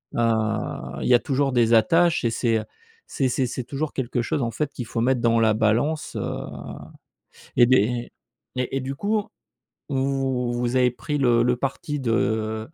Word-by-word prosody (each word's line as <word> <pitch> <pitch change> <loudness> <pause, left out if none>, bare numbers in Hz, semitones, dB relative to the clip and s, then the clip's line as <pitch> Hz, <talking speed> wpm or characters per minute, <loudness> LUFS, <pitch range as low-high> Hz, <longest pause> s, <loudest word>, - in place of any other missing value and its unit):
heu, - - -1
heu, 110 -2 -1
il - - -1
y - - +6
a 120 - +7
toujours 135 +1 0
des 120 -2 +3
attaches 165 +9 +4
et 115 - +1
c'est, 115 -2 +1
heu, - - -5 0.4
c'est 135 - -1
c'est 130 +1 0
c'est 125 +1 -4
toujours 145 +2 -3
quelque 125 -2 -2
chose, 130 - -1
en 115 -1 -1
fait, 145 +5 -2
qu'il 125 - -6
faut 115 0 -3
mettre 125 0 +2
dans 115 -1 +3
la 110 -1 +4
balance, 120 +9 0
heu, - - -2 1.3
et 120 - +7
des 130 +1 +5 0.8
et 125 - 0
et 125 - -3
et - - 0
du 135 +1 -4
coup, 210 +5 0 0.7
vous 130 -3 -1
avez 125 -1 +4
pris 145 +4 -4
le 120 -3 +3
le 125 0 +1
parti 140 +3 -3
de 110 -2 0
125 Hz, 190 wpm, -24 LUFS, 115-135 Hz, 1.3 s, a